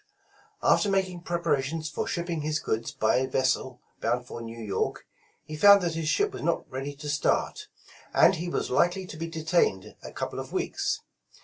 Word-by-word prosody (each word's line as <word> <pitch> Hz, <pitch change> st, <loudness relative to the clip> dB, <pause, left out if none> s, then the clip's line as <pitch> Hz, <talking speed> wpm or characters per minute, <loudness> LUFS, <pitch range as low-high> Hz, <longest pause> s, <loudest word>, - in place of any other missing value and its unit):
After 205 Hz, -, +4 dB
making 190 Hz, -2 st, 0 dB
preparations 160 Hz, -3 st, -1 dB
for 150 Hz, -, -3 dB
shipping 170 Hz, -2 st, -2 dB
his 155 Hz, +1 st, 0 dB
goods 115 Hz, -5 st, -2 dB
by 110 Hz, +2 st, +2 dB
a 130 Hz, +1 st, +1 dB
vessel 130 Hz, -1 st, 0 dB, 0.2 s
bound 120 Hz, +2 st, 0 dB
for 120 Hz, -, -7 dB
New 115 Hz, 0 st, -8 dB
York, 105 Hz, -3 st, -2 dB, 0.4 s
he 155 Hz, -, -7 dB
found 200 Hz, +4 st, +7 dB
that 170 Hz, -2 st, 0 dB
his 160 Hz, -1 st, -3 dB
ship 410 Hz, -, +1 dB
was -, -, -6 dB
not 170 Hz, -, 0 dB
ready 135 Hz, +2 st, -4 dB
to 145 Hz, +1 st, -8 dB
start, 145 Hz, 0 st, 0 dB, 0.4 s
and -, -, +6 dB
he 175 Hz, +2 st, -3 dB
was -, -, -2 dB
likely 175 Hz, +8 st, +2 dB
to 180 Hz, -, -9 dB
be 165 Hz, +1 st, -4 dB
detained 160 Hz, -, 0 dB
a -, -, -9 dB
couple -, -, -4 dB
of -, -, -7 dB
weeks. -, -, -1 dB
155 Hz, 185 wpm, -27 LUFS, 130-175 Hz, 0.4 s, found